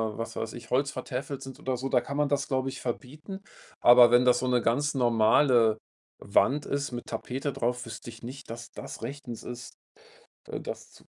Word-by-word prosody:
was 115 Hz, 0 st, -5 dB
weiß 110 Hz, -1 st, -4 dB
ich, 120 Hz, -1 st, -10 dB
holzvertäfelt 140 Hz, +1 st, -2 dB
sind 135 Hz, -1 st, -9 dB
oder 130 Hz, -1 st, -2 dB
so, 130 Hz, +2 st, -3 dB
da 125 Hz, -2 st, +3 dB
kann 140 Hz, +4 st, -5 dB
man 150 Hz, 0 st, +2 dB
das, 140 Hz, 0 st, 0 dB
glaube 130 Hz, -1 st, 0 dB
ich, -, -, -8 dB
verbieten. 150 Hz, +9 st, -5 dB, 0.4 s
Aber 120 Hz, 0 st, +8 dB
wenn 120 Hz, +1 st, +6 dB
das 125 Hz, -1 st, +5 dB
so 130 Hz, -, -1 dB
'ne 125 Hz, -1 st, +3 dB
ganz 140 Hz, +6 st, +1 dB
normale 115 Hz, -1 st, +4 dB, 0.4 s
Wand 140 Hz, +8 st, +2 dB
ist 140 Hz, -1 st, -2 dB
mit 120 Hz, -1 st, -5 dB
Tapete 130 Hz, +5 st, -3 dB
drauf, 125 Hz, +1 st, -1 dB
wüsste 115 Hz, 0 st, -8 dB
ich 115 Hz, 0 st, -12 dB
nicht, 130 Hz, +3 st, -8 dB
dass 115 Hz, +1 st, -8 dB
das -, -, -8 dB
rechtens 125 Hz, -2 st, -6 dB
ist, 125 Hz, +2 st, -7 dB, 0.8 s
d -, -, -4 dB
das -, -, -7 dB
zu -, -, -19 dB
125 Hz, 195 wpm, -28 LUFS, 120-140 Hz, 0.8 s, Aber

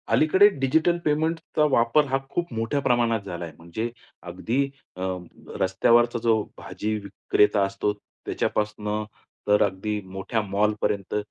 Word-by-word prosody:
अलीकडे 190 Hz, +6 st, +6 dB
डिजिटल 160 Hz, +6 st, +2 dB
पेमेंटचा 155 Hz, +1 st, 0 dB
वापर 120 Hz, +5 st, +4 dB
हा 135 Hz, -, +2 dB
खूप 175 Hz, -3 st, -2 dB
मोठ्या 115 Hz, +5 st, -1 dB
प्रमाणात 120 Hz, -4 st, +2 dB
झालाय. 85 Hz, -3 st, -6 dB
म्हणजे 85 Hz, +8 st, -4 dB, 0.3 s
अगदी 100 Hz, +10 st, -1 dB, 0.3 s
अ, 90 Hz, -, -8 dB, 0.6 s
रस्त्यावरचा 120 Hz, +6 st, +3 dB
जो 110 Hz, -2 st, +3 dB
भाजी 110 Hz, +1 st, -4 dB
विक्रेता 100 Hz, 0 st, +1 dB
असतो 100 Hz, +1 st, -1 dB
त्याच्यापासून 105 Hz, +1 st, -3 dB, 0.4 s
तर 105 Hz, 0 st, +4 dB
अगदी 105 Hz, +2 st, -2 dB
मोठ्या 95 Hz, +4 st, -1 dB
मॉलपर्यंत 105 Hz, -1 st, -1 dB
110 Hz, 115 wpm, -25 LUFS, 100-130 Hz, 0.6 s, अलीकडे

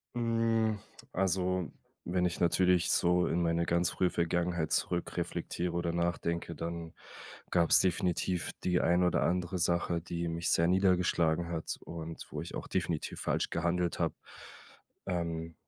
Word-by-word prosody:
Hm, 115 Hz, -2 st, +1 dB, 0.4 s
also 90 Hz, -1 st, 0 dB, 0.3 s
wenn 90 Hz, +1 st, 0 dB
ich 85 Hz, -, -1 dB
natürlich 90 Hz, 0 st, +3 dB
so 90 Hz, 0 st, +3 dB
in 85 Hz, -, 0 dB
meine 85 Hz, 0 st, +1 dB
ganz 85 Hz, 0 st, +1 dB
frühe 90 Hz, -1 st, +1 dB
Vergangenheit 85 Hz, -1 st, 0 dB
zurückreflektiere 90 Hz, 0 st, -1 dB
oder 85 Hz, -1 st, -1 dB
nachdenke, 85 Hz, 0 st, -1 dB
dann 85 Hz, +1 st, -5 dB, 0.6 s
gab's 85 Hz, -2 st, +6 dB
definitiv 90 Hz, -1 st, 0 dB
die 90 Hz, -1 st, +2 dB
ein 90 Hz, +1 st, +3 dB
oder 90 Hz, -, +2 dB
andere 90 Hz, +1 st, 0 dB
Sache, 85 Hz, 0 st, +1 dB
die 85 Hz, 0 st, -3 dB
mich 85 Hz, 0 st, -2 dB
sehr 85 Hz, -, +3 dB
niedergeschlagen 90 Hz, -3 st, +2 dB
hat 80 Hz, -2 st, -3 dB
und 80 Hz, -1 st, -7 dB
wo -, -, -4 dB
ich -, -, -7 dB
auch -, -, -5 dB
definitiv 80 Hz, -3 st, -2 dB
falsch -, -, 0 dB
gehandelt 85 Hz, +1 st, 0 dB
habe. -, -, 0 dB, 0.9 s
Ähm 85 Hz, -2 st, -3 dB
85 Hz, 140 wpm, -31 LUFS, 85-90 Hz, 0.9 s, gab's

